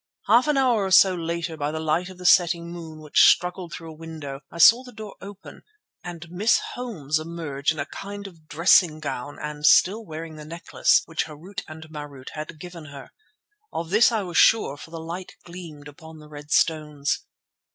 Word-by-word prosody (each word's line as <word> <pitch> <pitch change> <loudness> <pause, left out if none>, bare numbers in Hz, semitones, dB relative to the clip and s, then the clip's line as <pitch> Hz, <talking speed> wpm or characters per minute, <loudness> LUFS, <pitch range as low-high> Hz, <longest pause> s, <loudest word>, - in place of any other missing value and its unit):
Half 235 +7 +4
an 300 -2 +2
hour 245 -6 +3
or - - -2
so 190 0 +6
later 170 -1 -3
by 145 -1 -2
the 160 - -4
light 160 +3 -1
of 185 - -12
the 180 - -10
setting 170 -1 +4
moon 160 -2 -9
which 150 -1 +2
struggled 180 -1 +3
through 165 -2 -8
a - - -12
window, 155 -4 -8
I - - -11
saw 230 +8 +7
the 250 - -12
door 215 -3 -9
open 200 0 -11 0.4
and 175 -1 -8
Miss 205 +6 +3
Holmes 160 - -3
emerge 155 -3 -3
in 160 - -6
a 140 - -2
kind 200 +4 -8
of 165 -5 -13
dressing 165 0 +4
gown 145 -1 -5
and 150 0 -6
still 200 +8 +5
wearing 160 -3 -8
the 150 - -9
necklace 165 +2 +1
which 165 -1 -2
Harût 175 +6 -8
and 155 0 -10
Marût 145 -4 -9
had 155 0 -8
given 175 -2 -9
her. 140 -2 -11 0.6
Of 165 +1 -5
this 220 +4 +5
I 220 -3 -1
was 175 -3 -4
sure 220 -11 +4
for 145 - -12
the 165 0 -7
light 170 +3 -7
gleamed 170 -4 -10
upon 160 +2 -13
the 150 -1 -14
red 145 -1 -11
stones. 150 -3 +1
165 Hz, 195 wpm, -24 LUFS, 155-185 Hz, 0.6 s, saw